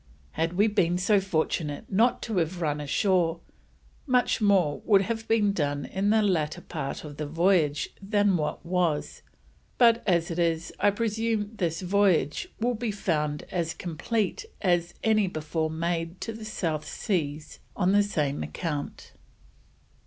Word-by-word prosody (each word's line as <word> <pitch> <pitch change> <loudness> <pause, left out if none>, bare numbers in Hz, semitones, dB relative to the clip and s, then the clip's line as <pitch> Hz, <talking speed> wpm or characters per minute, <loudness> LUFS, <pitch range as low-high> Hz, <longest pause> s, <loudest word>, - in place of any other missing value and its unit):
Had 165 +1 -1
we 200 +4 +3
been 190 -5 +2
so 200 +3 +3
fortunate 160 -5 -1
not 225 +6 +2
to 220 -4 -3
have 175 +1 0
run 150 -3 -1
ashore, 170 +2 +1 0.7
much 250 -3 +2
more 190 -8 +3
would 200 -3 +4
have 225 +2 -4
been 210 -3 +3
done 145 -5 -1
in 195 +2 -1
the 220 0 +4
latter 170 -4 0
part 145 -6 -5
of 145 -2 -9
the 150 - -3
Voyage 165 -2 +2
than 205 -1 +2
what 155 0 -2
was, 170 -4 -1 0.6
but 235 -1 +5
as 170 -2 +2
it 165 - -3
is, 165 -1 0
I 205 - +4
presume 220 0 -1
this 170 -4 -2
Voyage 195 - +2
will 245 +2 +1
be 235 0 -3
found 150 -7 -1
as 170 -2 -2
compleat 195 - -2 0.2
as 175 -2 +1
any 215 -3 +3
before 155 -1 -2
made 165 +2 -2
to 225 - -4
the 220 0 -8
South 165 -8 -3
Seas 155 -7 -3 0.2
on 185 -1 +2
the 205 +1 +5
same 150 -9 -1
account. 150 -5 -5
180 Hz, 155 wpm, -27 LUFS, 160-205 Hz, 0.7 s, but